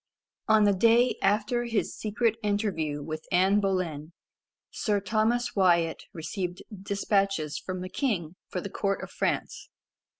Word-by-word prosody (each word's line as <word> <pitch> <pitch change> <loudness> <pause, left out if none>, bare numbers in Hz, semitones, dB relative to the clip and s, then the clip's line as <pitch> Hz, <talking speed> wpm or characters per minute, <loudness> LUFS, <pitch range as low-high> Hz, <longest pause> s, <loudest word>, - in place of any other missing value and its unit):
On 220 -1 +5
the 205 -1 +5
day 230 +5 +4
after 215 +4 +1
his 230 -3 -1
secret 225 +1 0
interview 190 -9 -1
with 155 +1 -6
Anne 190 +3 +4
Boleyn, 175 -6 -2 0.6
Sir 210 -3 0
Thomas 220 +4 0
Wyat 170 -4 +2
received 175 +2 -5
despatches 195 -4 0
from 185 -1 -5
the 185 - -4
king 185 - -2
for 180 - -3
the 200 - -6
court 195 -1 -1
of - - -8
France. - - -2
195 Hz, 135 wpm, -28 LUFS, 175-215 Hz, 0.6 s, On